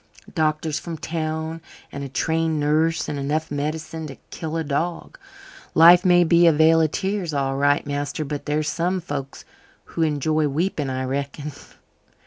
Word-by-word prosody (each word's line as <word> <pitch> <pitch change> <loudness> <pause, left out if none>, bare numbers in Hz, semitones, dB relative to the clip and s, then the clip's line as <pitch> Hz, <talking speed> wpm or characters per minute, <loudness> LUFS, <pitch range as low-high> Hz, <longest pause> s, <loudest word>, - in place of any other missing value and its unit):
Doctors 155 0 0
from 170 -2 -6
town 160 0 -3 0.3
and 140 - -6
a 140 - -6
trained 160 +3 0
nurse 155 +1 +1
and 145 - -3
enough 150 +3 -2
medicine 155 +2 -4
to 135 - -9 0.2
kill 160 0 -4
a 165 - -1
dog! 160 +4 -3 0.6
Life 175 +3 +8
may 175 -2 +5
be 170 0 +5
a - - +7
vale 160 +1 +5
of 160 - +2
tears, 190 -2 -2
all 135 -1 0
right, 145 +1 +2
master, 145 +1 -3
but 145 0 -5
there 150 +1 +1
are 155 - 0
some 175 +4 -1
folks 145 -5 -6 0.5
who 165 - -2
enjoy 155 0 +1
weeping, 150 -1 -1
I 130 0 -2
reckon." 140 +3 -4
155 Hz, 165 wpm, -23 LUFS, 145-165 Hz, 0.6 s, Life